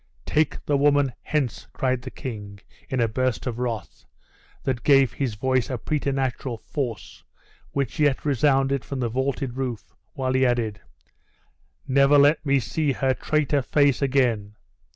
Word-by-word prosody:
"Take 155 +1 0
the 145 - +2
woman 145 -2 +3
hence," 140 -7 -2
cried 130 -1 0
the 130 - -7
king, 105 -7 -7 0.3
in 130 - -1
a 115 - +3
burst 130 +1 -1
of 120 -2 -3
wrath, 115 -3 -4 0.6
that 130 -3 -1
gave 135 -1 +4
his 130 -6 -2
voice 130 +2 0
a 130 - -2
preternatural 135 -2 -2
force, 115 - -5 0.5
which 140 -3 -3
yet 145 -2 +2
resounded 135 -1 +2
from 140 - -5
the 120 -2 0
vaulted 130 +1 -2
roof, 120 -7 -4 0.2
while 130 -2 -1
he 130 0 +3
added 115 -5 0 1.1
"Never 140 +2 +5
let 145 +3 +5
me 140 -2 +3
see 140 +5 -1
her 130 0 +1
traitor 145 0 0
face 140 0 +2
again!" 120 -7 +1
130 Hz, 150 wpm, -24 LUFS, 120-140 Hz, 1.1 s, Never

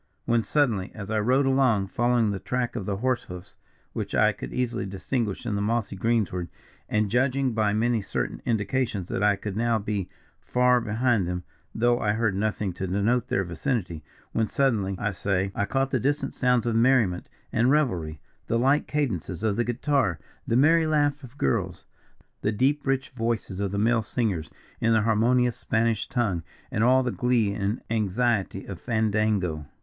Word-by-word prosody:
When 115 -1 +2
suddenly, 110 -5 +1
as 100 -1 -6
I 110 - +1
rode 130 +6 +3
along, 130 -8 +2
following 120 -2 +2
the 100 - -3
track 125 +2 -2
of 105 -6 -4
the 100 -1 -1
horse 125 +3 0
hoofs, 90 +1 -10 0.4
which - - -4
I - - +4
could 60 - -8
easily 120 -4 -2
distinguish 100 +2 -3
in 110 - -1
the 100 - -1
mossy 110 -1 -1
greensward, 95 -4 0 0.4
and 105 -2 +1
judging 130 +1 +1
by 105 -2 +1
many 115 +1 +1
certain 60 -10 -3
indications 110 -3 -1
that - - -2
I 105 0 +4
could 100 0 -6
not 115 - 0
now 115 -1 +2
be 100 -3 -3 0.3
far 125 0 +2
behind 115 -3 +1
them, 90 0 -3 0.3
though 120 +1 +2
I 105 -3 +1
heard 110 -2 +1
nothing 105 -2 -1
to 95 +2 -4
denote 110 +6 +1
their 95 - 0
vicinity; 85 - -3 0.3
when 110 -1 0
suddenly 105 -9 +1
I 105 +2 -1
say, 95 +1 -1
I 100 - 0
caught 135 +5 0
the 130 - +1
distant 145 +4 -1
sounds 125 -2 +2
of 115 -1 0
merriment, 115 -7 +2 0.2
and 120 +3 +3
revelry; 90 - +1 0.3
the 115 - +1
light 135 +5 +2
cadences 105 - -2
of 105 -2 +1
the 120 - +1
guitar, 120 - 0 0.3
the 115 - +2
merry 160 +4 +4
laugh 145 -2 +1
of 130 +2 -12
girls, 90 - -1 0.6
the 105 - +1
deep 135 +7 +1
rich 135 -1 0
voices 115 -5 -2
of 100 -1 -1
the 100 - -3
male 115 +2 +3
singers, 105 -8 -2 0.3
in 115 0 +2
the 110 - +4
harmonious 120 +2 +2
Spanish 115 -2 0
tongue, 110 -9 0 0.3
and 105 - +1
all 130 +2 +5
the 125 - -1
glee 120 -5 +1
and 100 +3 -2
anxiety 110 -2 0
of 95 -3 -8
fandango. 110 - 0
110 Hz, 180 wpm, -26 LUFS, 100-125 Hz, 0.6 s, all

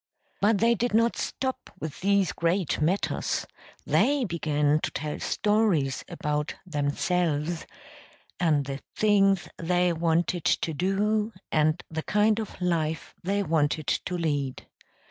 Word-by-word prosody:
But 210 +1 +4
they 230 +3 +4
did 235 -1 0
not 230 +1 +3
stop 260 -1 -3
with 155 -1 -6
these 200 -1 +3
great 170 -2 0
matters; 180 +6 0 0.4
they 280 0 +3
began 150 -4 +1
to - - -2
tell 150 -1 -4
stories 205 -11 +1
about 150 0 -2
themselves 160 +1 -1 0.7
and 155 -5 +2
the 135 0 -4 0.2
things 195 -3 +3
they 180 +1 +2
wanted 170 +1 0
to 160 - +1
do 210 +6 0 0.2
and 155 +1 +2
the 160 0 -2
kind 210 +4 +2
of 220 - -6
life 160 -3 -1
they 200 +3 0
wanted 155 -2 +1
to 180 - -1
lead. 145 -6 -2
175 Hz, 125 wpm, -27 LUFS, 155-200 Hz, 0.7 s, But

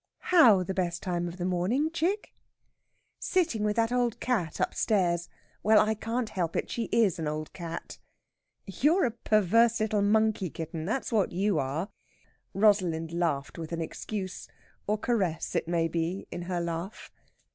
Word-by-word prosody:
"How 230 - +7
the 190 - -3
best 175 -2 -2
time 175 -2 -1
of 170 +1 -7
the 180 - -3
morning, 195 - 0
chick?" 355 +6 -1 0.9
"Sitting 320 - 0
with 210 0 +1
that 230 0 +1
old 245 -2 0
cat 200 -11 -1
upstairs.... 175 -5 +1 0.3
Well, 215 +1 +5
I 215 +1 +3
can't 225 +2 -3
help 175 -5 -2
it. - - -2
She 235 - -2
is 210 -8 +2
an 160 - -2
old 155 0 -4
cat." 170 -2 -7 0.7
"You're 295 - +2
a 240 - 0
perverse 230 +1 +3
little 215 -1 +1
monkey, 210 -2 +2
kitten; 160 0 -6
that's 240 +9 -2
what 210 -5 +2
you 195 +3 +1
are!" 145 +9 -2 0.7
Rosalind 185 -6 +2
laughed 165 -4 -1
with 160 0 -6
an 170 0 -2
excuse 185 +3 -5 0.4
or 210 +1 +1
caress, 200 -8 -1
it - - 0
may 165 -1 +1
be 165 +3 -2
in 175 - -5
her 180 -1 -1
laugh. 170 +4 -5
195 Hz, 160 wpm, -28 LUFS, 170-225 Hz, 0.9 s, How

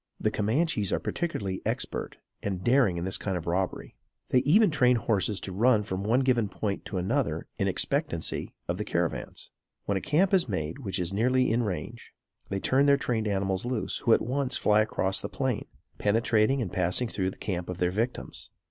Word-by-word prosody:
The 110 - +1
Camanches 110 - 0
are - - +2
particularly 100 - -3
expert - - -2 0.2
and 95 -2 -3
daring 120 -8 +3
in 85 - -3
this 95 - -2
kind 95 -3 -2
of 85 - -6
robbery. 90 +2 -2 0.4
They 130 - +4
even 170 - +4
train 125 -4 +4
horses 105 -4 0
to 95 - -5
run 110 +3 +3
from 95 -1 -4
one 115 +5 +3
given 120 -5 +2
point 100 0 -3
to 100 - -4
another 90 +1 -1
in - - +1
expectancy - - -1
of - - -2
caravans. - - -3 0.3
When 100 - 0
a - - -3
camp 180 - +2
is 180 -9 +3
made 80 - -3
which 100 -8 -3
is 90 +1 -2
nearly 125 +4 +2
in 115 +2 +2
range 95 -9 -5 0.4
they 100 - -1
turn 135 +7 +3
their 140 0 +6
trained 115 -5 -1
animals 95 -1 0
loose, 120 -2 -1
who 115 - +3
at - - -1
once 130 +2 0
fly 105 0 +4
across 95 -3 0
the - - -4
plain, 130 -6 -2 0.3
penetrating 115 +4 +2
and 95 - -6
passing 90 +7 +1
through 95 -4 -1
the - - -10
camp 90 -3 -4
of 90 - -4
their 90 0 +1
victims. 115 +6 -3
105 Hz, 195 wpm, -28 LUFS, 95-125 Hz, 0.4 s, their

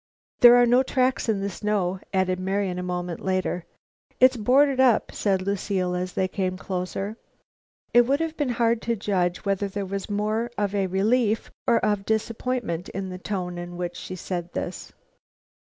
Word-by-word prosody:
"There 240 0 +9
are 245 0 +6
no 245 +2 +5
tracks 255 -2 0
in 205 -3 +1
the 200 - -1
snow," 190 -2 -1
added 185 -1 +1
Marian, 190 -1 -1
a - - -2
moment 180 -1 -3
later. 185 -2 -1 0.5
"It's 255 0 +6
boarded 260 +4 +3
up," 255 -4 +4
said 195 -3 0
Lucile, 190 -2 -1
as 180 0 -3
they 190 - +1
came 185 -1 -2
closer. 195 +3 -4 0.8
It 240 0 +6
would 280 +2 +2
have 325 -1 -2
been 290 -4 -1
hard 235 -1 +1
to 235 0 -1
judge 185 -3 -1
whether 200 0 0
there 200 0 -4
was 195 +1 -5
more 215 +3 -1
of 205 -1 0
relief 205 +4 +1 0.2
or 235 -2 +5
of 205 -2 0
disappointment 220 -4 -2
in 190 0 -5
the 185 0 -7
tone 180 -3 -4
in 175 0 -7
which 175 -1 -4
she 185 - -7
said 175 -1 -5
this. - - -5
200 Hz, 170 wpm, -25 LUFS, 185-235 Hz, 0.8 s, There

